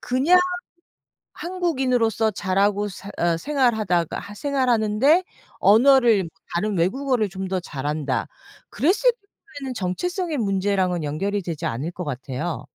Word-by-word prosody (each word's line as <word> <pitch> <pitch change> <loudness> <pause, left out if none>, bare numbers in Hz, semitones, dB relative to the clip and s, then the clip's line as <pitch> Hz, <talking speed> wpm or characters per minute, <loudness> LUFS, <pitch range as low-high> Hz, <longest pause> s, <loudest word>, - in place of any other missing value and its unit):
그냥 275 +9 +3 0.9
한국인으로서 260 - 0
자라고 200 +1 0
사 195 +1 -9
어 170 -1 +2
생활하다가 215 - 0
생활하는데 255 - +2 0.4
언어를 230 -3 +5 0.3
다른 205 +4 0
외국어를 235 +5 +1
좀 190 +1 -5
더 190 0 -1
잘한다 145 -3 -3 0.4
그랬을 370 - +3 0.5
경우에는 265 -2 -5
정체성의 315 - -2
문제랑은 195 -4 0
연결이 195 +8 -2
되지 170 -4 -4
않을 135 +9 -3
것 180 - -6
같아요. 135 +1 -4
205 Hz, 295 characters per minute, -23 LUFS, 175-260 Hz, 0.9 s, 언어를